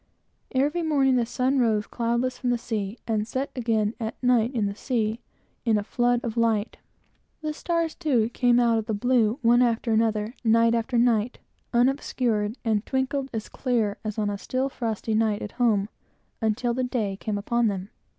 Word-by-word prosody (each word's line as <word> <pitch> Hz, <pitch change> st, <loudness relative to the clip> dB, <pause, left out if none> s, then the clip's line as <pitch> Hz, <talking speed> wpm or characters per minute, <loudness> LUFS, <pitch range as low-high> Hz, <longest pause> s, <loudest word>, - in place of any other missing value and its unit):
Every 290 Hz, +6 st, +2 dB
morning 280 Hz, -5 st, +3 dB
the 240 Hz, -2 st, +1 dB
sun 260 Hz, +2 st, +1 dB
rose 220 Hz, -4 st, +2 dB
cloudless 235 Hz, +2 st, -1 dB
from 250 Hz, -, -1 dB
the 245 Hz, -, +2 dB
sea, 220 Hz, -2 st, -4 dB
and 215 Hz, -2 st, -1 dB
set 260 Hz, +4 st, -3 dB
again 225 Hz, -3 st, 0 dB
at 225 Hz, -1 st, -3 dB
night, 245 Hz, -1 st, +3 dB
in 220 Hz, -3 st, +1 dB
the 200 Hz, -, -2 dB
sea, 220 Hz, 0 st, -1 dB, 0.4 s
in 225 Hz, -3 st, +3 dB
a 205 Hz, -, -1 dB
flood 240 Hz, +2 st, +1 dB
of 230 Hz, -2 st, -3 dB
light. 225 Hz, -2 st, +1 dB, 0.7 s
The 305 Hz, 0 st, -2 dB
stars, 335 Hz, 0 st, -1 dB
too, 255 Hz, -10 st, +1 dB
came 245 Hz, 0 st, +3 dB
out 230 Hz, -2 st, +3 dB
of 220 Hz, -, -6 dB
the 220 Hz, -, -1 dB
blue, 235 Hz, 0 st, +2 dB
one 240 Hz, +1 st, +5 dB
after 235 Hz, -1 st, +1 dB
another, 220 Hz, 0 st, +1 dB
night 230 Hz, 0 st, +4 dB
after 235 Hz, +1 st, 0 dB
night, 235 Hz, -1 st, +2 dB, 0.3 s
unobscured, 240 Hz, -3 st, +1 dB
and 215 Hz, -2 st, +1 dB
twinkled 265 Hz, +1 st, -1 dB
as 220 Hz, -2 st, -4 dB
clear 230 Hz, -6 st, -1 dB
as 215 Hz, -1 st, -4 dB
on 210 Hz, -1 st, 0 dB
a 200 Hz, -, -4 dB
still 260 Hz, +5 st, -1 dB
frosty 225 Hz, -3 st, -3 dB
night 215 Hz, -1 st, +1 dB
at 210 Hz, -, -6 dB
home, 210 Hz, -4 st, +3 dB, 0.5 s
until 225 Hz, +2 st, 0 dB
the 255 Hz, +2 st, -1 dB
day 230 Hz, -6 st, -1 dB
came 205 Hz, +1 st, -3 dB
upon 235 Hz, +3 st, +1 dB
them. 195 Hz, -1 st, -3 dB
230 Hz, 180 wpm, -25 LUFS, 215-250 Hz, 0.7 s, one